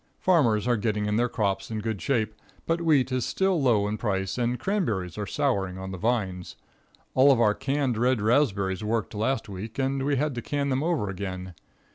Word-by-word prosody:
Farmers 125 - +3
are 120 -1 +3
getting 105 -1 -1
in 105 +1 0
their 120 +1 +2
crops 100 -4 -1
in 110 - -3
good 110 -3 -3
shape, 110 -4 0 0.3
but 165 +1 0
wheat 145 -6 +3
is 130 -1 0
still 190 -4 +1
low 110 -6 +3
in 105 +1 -3
price, 95 -3 -1
and 120 0 0
cranberries 110 - -1
are 105 -1 -4
souring 100 -11 -1
on 95 0 -6
the 95 - -5
vines. 95 -6 -1 0.6
All 135 +2 +6
of 130 - +3
our 105 -3 +4
canned 135 -2 -1
red 125 0 +2
raspberries 105 -5 +1
worked 110 0 -1
last 115 +5 -1
week, 105 +3 -7
and 135 0 0
we 140 +1 +1
had 145 +2 0
to 120 - -4
can 140 +1 -2
them 130 0 0
over 160 -9 0
again. 95 -1 -5
115 Hz, 200 wpm, -26 LUFS, 100-135 Hz, 0.6 s, All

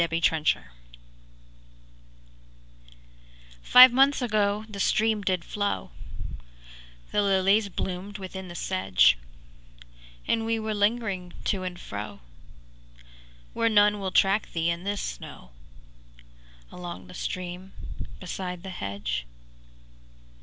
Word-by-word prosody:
0 170 - +3
Autoplay 160 -1 +1 3.0
Five 255 - +9
months 275 +2 +4
ago 215 -3 0
the 205 -2 -8
stream 215 +1 +2
did 185 -3 -1
flow, 205 -1 -2 1.2
The 210 - +2
lilies 200 +1 +3
bloomed 190 +2 -4
within 190 -1 -7
the 175 - -9
sedge, 90 - +3 1.1
And 225 - +1
we 225 0 0
were 220 -1 -2
lingering 205 -4 0
to 195 - 0
and 180 -1 -5
fro, 105 -4 -7 1.3
Where 230 0 +2
none 210 -1 +4
will 195 -1 -2
track 195 +3 +2
thee 165 0 +1
in 170 +2 -5
this 205 0 -2
snow, - - -8 1.2
Along 175 - -8
the 90 - -13
stream, 180 - -5 0.5
beside 180 -1 -5
the 190 - -6
hedge. 100 - -4
190 Hz, 105 wpm, -27 LUFS, 170-210 Hz, 3.0 s, Five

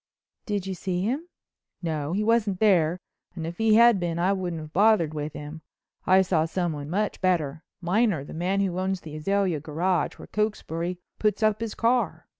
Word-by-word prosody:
"Did 205 -3 -1
you 195 - -3
see 180 0 -2
him?" 270 - -2 0.6
"No, 155 -2 -2
he 205 +3 0
wasn't 215 -4 +2
there 180 -6 +3 0.4
and 165 -3 -4
if 170 +1 -6
he 220 -1 +4
had 235 -2 +6
been 170 -2 -2
I 180 +3 +2
wouldn't 180 -4 -3
have 155 0 -10
bothered 200 -6 +4
with 150 0 -4
him. 150 +2 -8 0.5
I 190 +1 +6
saw 170 -4 +1
someone 160 -4 -3
much 205 +5 -1
better—Miner, 175 - 0
the - - -10
man 185 +4 0
who 185 -2 -1
owns 190 0 -1
the 155 -1 -9
Azalea 190 0 0
Garage, 165 +4 -1
where - - -10
Cokesbury 180 -5 -2 0.2
puts 215 +1 +1
up 215 0 +2
his 230 -2 -3
car. 230 -9 +1
185 Hz, 180 wpm, -26 LUFS, 160-210 Hz, 0.6 s, had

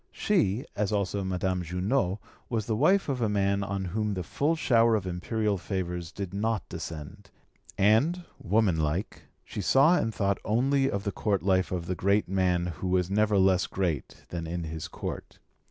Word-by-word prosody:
She, 135 - +1
as 105 0 0
also 100 -1 -1
Madame 95 0 -1
Junot, 90 +3 0 0.3
was 110 -4 -1
the 110 - 0
wife 185 - +3
of 135 -4 -2
a 110 - +2
man 100 -1 +1
on 95 -1 -3
whom 105 +3 -1
the 90 - -3
full 145 - 0
shower 115 -7 +4
of 105 -3 -1
imperial 100 +3 -1
favours 90 -3 -3
did 100 -2 -6
not 110 -1 -1
descend, 85 +6 -7 0.5
and, 135 - +3 0.2
womanlike, 90 -4 0 0.2
she 105 - -5
saw 140 - +5
and 115 - 0
thought 100 -2 0
only 135 +5 +2
of 100 -4 -2
the 100 - -1
Court 100 +1 -1
life 95 -1 +2
of 90 -2 -2
the 90 - -2
great 100 +4 +1
man 90 -2 +1 0.2
who 95 - -1
was 90 0 +1
never 105 0 +3
less 95 -1 +3
great 85 -7 -3
than 85 -2 -4
in 85 +1 -3
his 80 0 -5
Court. - - -6
100 Hz, 175 wpm, -28 LUFS, 90-110 Hz, 0.5 s, saw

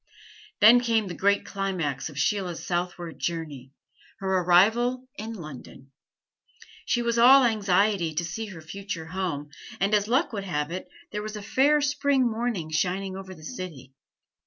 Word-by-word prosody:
Then 225 +4 +9
came 230 -3 +1
the 180 - -5
great 200 +4 +1
climax 180 -9 -3
of 145 - -12
Sheila's 180 +3 -1
southward 175 -1 -3
journey 150 -6 -4 0.5
her 190 -2 0
arrival 225 +9 +3
in 220 +2 -6
London. 140 - -10 1.0
She 240 - +1
was 235 0 0
all 265 +3 +8
anxiety 200 -6 +2
to 170 +2 -1
see 215 +7 -5
her 180 -6 -10
future 190 0 -6
home; 165 -5 -4 0.3
and 195 +2 +1
as 210 -1 +3
luck 260 +4 +1
would 200 -2 -3
have 150 -3 -2
it, 185 +1 -6 0.2
there 210 - -3
was 215 0 -6
a 210 - -7
fair 275 +8 +3
spring 285 -2 +2
morning 220 -8 -2
shining 185 +4 -1
over 190 -1 -8
the 155 - -15
city. 160 - -8
195 Hz, 160 wpm, -26 LUFS, 170-225 Hz, 1.0 s, Then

